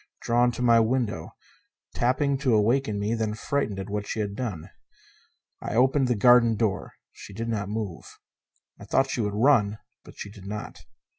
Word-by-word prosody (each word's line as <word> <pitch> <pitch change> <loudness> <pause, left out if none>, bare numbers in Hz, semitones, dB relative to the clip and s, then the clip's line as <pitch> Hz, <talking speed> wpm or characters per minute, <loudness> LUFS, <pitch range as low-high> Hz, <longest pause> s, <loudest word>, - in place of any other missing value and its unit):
Drawn 120 +1 +3
to 125 - -4
my 115 -1 +5
window; 115 -7 -1 0.6
tapping 130 +3 +1
to 130 -5 +2
awaken 110 0 +1
me, 105 +2 -1
then 110 -2 -2
frightened 110 -2 -2
at 95 - -5
what 105 0 -4
she - - -4
had 100 -2 -2
done. 100 -10 -5 0.9
I - - -4
opened 130 +2 +3
the 125 - +1
garden 120 +1 +5
door. 110 -2 -2 0.2
She 100 - -12
did 115 +3 -4
not 105 -3 -2
move. 105 -5 -6 0.6
I 100 - -10
thought 135 +6 +1
she 120 - -1
would 105 -1 -2
run, 110 -4 +3 0.3
but - - -15
she 100 - -7
did 100 -2 -12
not. 105 +1 -6
110 Hz, 175 wpm, -26 LUFS, 105-125 Hz, 0.9 s, my